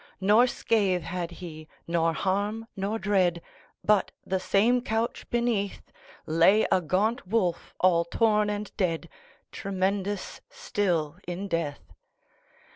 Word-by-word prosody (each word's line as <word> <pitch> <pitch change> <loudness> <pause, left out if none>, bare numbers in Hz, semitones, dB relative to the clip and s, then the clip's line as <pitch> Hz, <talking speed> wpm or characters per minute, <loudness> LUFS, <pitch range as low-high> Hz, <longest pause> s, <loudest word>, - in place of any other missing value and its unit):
Nor 210 +6 +5
scath 200 -7 +1
had 175 +2 -3
he, 165 -3 -9 0.2
nor 165 -1 +1
harm, 205 +5 -1
nor 200 +3 -2
dread, 190 -5 +2 0.4
But, 210 -3 +3
the 190 0 0
same 225 +7 +3
couch 225 -1 -2
beneath, 235 -5 -1 0.3
Lay 170 +7 +4
a 185 - +4
gaunt 195 +7 0
wolf, 185 -5 -1
all 170 -2 +4
torn 210 +2 +2
and 210 0 -4
dead, 170 -4 -1 0.4
Tremendous 195 +1 -2
still 185 - -1
in 180 +3 -4
death. 165 -5 -3
195 Hz, 120 wpm, -27 LUFS, 175-210 Hz, 0.4 s, Nor